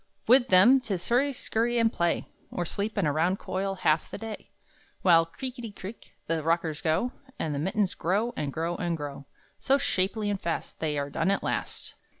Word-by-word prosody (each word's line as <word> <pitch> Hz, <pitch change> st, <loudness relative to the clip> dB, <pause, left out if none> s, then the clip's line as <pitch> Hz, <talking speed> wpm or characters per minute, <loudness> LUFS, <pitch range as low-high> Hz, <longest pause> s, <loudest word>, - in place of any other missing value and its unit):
With 250 Hz, +2 st, +6 dB
them 225 Hz, +7 st, +7 dB
'tis 195 Hz, -8 st, -3 dB
hurry 265 Hz, +4 st, +3 dB
scurry 240 Hz, -2 st, 0 dB
and 230 Hz, -1 st, +3 dB
play, 170 Hz, 0 st, 0 dB, 0.2 s
Or 175 Hz, -, -3 dB
sleep 205 Hz, +6 st, -3 dB
in 200 Hz, -, +2 dB
a 150 Hz, -, +2 dB
round 170 Hz, +5 st, +2 dB
coil 195 Hz, +1 st, -3 dB
half 155 Hz, 0 st, +3 dB
the -, -, -6 dB
day; 225 Hz, -2 st, -7 dB, 0.5 s
While, 165 Hz, -3 st, +6 dB
creakety 245 Hz, +4 st, -6 dB
creak, 200 Hz, +2 st, -10 dB
the 165 Hz, -1 st, -1 dB
rockers 165 Hz, -1 st, 0 dB
go, 165 Hz, +10 st, +1 dB, 0.3 s
And 155 Hz, -, -2 dB
the 140 Hz, -, -2 dB
mittens 190 Hz, +4 st, 0 dB
grow, 210 Hz, +8 st, 0 dB
and 145 Hz, -2 st, -2 dB
grow, 165 Hz, +4 st, -2 dB
and 170 Hz, -2 st, -1 dB
grow, 140 Hz, -2 st, -7 dB, 0.3 s
So 275 Hz, -, +3 dB
shapely 205 Hz, -2 st, 0 dB
and 200 Hz, -, -3 dB
fast 170 Hz, -, -3 dB
They 150 Hz, -2 st, -1 dB
are 140 Hz, 0 st, -2 dB
done 165 Hz, +6 st, 0 dB
at 200 Hz, -, +1 dB
last! -, -, -3 dB
185 Hz, 190 wpm, -28 LUFS, 165-225 Hz, 0.5 s, them